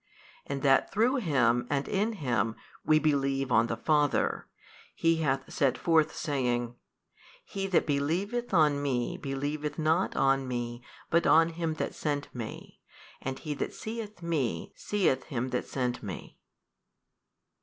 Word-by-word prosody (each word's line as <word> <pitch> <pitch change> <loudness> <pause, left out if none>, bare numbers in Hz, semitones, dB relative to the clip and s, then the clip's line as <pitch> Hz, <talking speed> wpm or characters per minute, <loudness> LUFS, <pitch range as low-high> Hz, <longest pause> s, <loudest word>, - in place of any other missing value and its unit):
And 140 -1 -4
that 135 -1 +4
through 240 +6 +2
Him 125 - +2
and 140 -1 0
in 210 +3 0
Him 120 - 0 0.3
we 155 - +4
believe 140 -3 +1
on 115 - +4
the 115 - -3
Father, 150 +3 +1 0.5
He 165 0 +2
hath 135 -4 -1
set 135 -3 +2
forth 160 -2 +2
saying, 120 -4 -1 0.7
He 195 -1 -3
that 190 - +2
believeth 175 +12 -1
on 150 -5 +4
Me 130 -4 -1
believeth 145 +2 -3
not 160 +3 +1
on 135 -1 +2
Me 120 -1 -4 0.3
but 170 +1 +3
on 165 +1 +6
Him 165 -1 -2
That - - -3
sent 145 -2 -3
Me 115 -3 -8 0.4
and 135 0 -3
he 155 -3 -4
that - - -4
seeth 215 -4 -6
Me 155 -8 -1
seeth 195 -10 0
Him 130 -3 -3
that 125 - -2
sent 125 -2 -2
Me. 95 -5 -8
145 Hz, 145 wpm, -29 LUFS, 130-165 Hz, 0.7 s, on